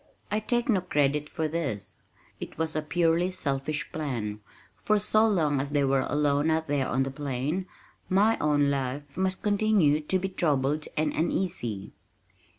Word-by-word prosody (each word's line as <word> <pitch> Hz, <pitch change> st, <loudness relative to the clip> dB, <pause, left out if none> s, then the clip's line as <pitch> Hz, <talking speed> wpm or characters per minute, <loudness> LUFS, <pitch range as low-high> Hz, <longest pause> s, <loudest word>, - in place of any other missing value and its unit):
I 210 Hz, -, +2 dB
take 240 Hz, +2 st, 0 dB
no 205 Hz, -7 st, +3 dB
credit 150 Hz, -3 st, 0 dB
for 160 Hz, -, -2 dB
this, 130 Hz, -12 st, -4 dB, 0.4 s
it -, -, -8 dB
was 160 Hz, 0 st, -2 dB
a 155 Hz, -, +1 dB
purely 165 Hz, +3 st, +1 dB
selfish 145 Hz, -4 st, -2 dB
plan, 120 Hz, -9 st, -3 dB, 0.4 s
for 215 Hz, -, +3 dB
so 215 Hz, +2 st, +3 dB
long 155 Hz, -9 st, +2 dB
as 140 Hz, -, -4 dB
they 145 Hz, -1 st, +1 dB
were 135 Hz, -1 st, +2 dB
alone 145 Hz, +1 st, +2 dB
out 160 Hz, 0 st, 0 dB
there 140 Hz, -2 st, 0 dB
on 135 Hz, +1 st, +1 dB
the 135 Hz, -, -3 dB
plain 145 Hz, +6 st, -3 dB, 0.4 s
my 205 Hz, +4 st, +4 dB
own 145 Hz, -1 st, +2 dB
life 140 Hz, +1 st, -3 dB
must 190 Hz, 0 st, -1 dB
continue 205 Hz, -8 st, +3 dB
to 155 Hz, +5 st, +1 dB
be 190 Hz, +1 st, -2 dB
troubled 150 Hz, -4 st, 0 dB
and 155 Hz, -1 st, +1 dB
uneasy. 150 Hz, -, -2 dB
150 Hz, 160 wpm, -27 LUFS, 140-185 Hz, 0.4 s, my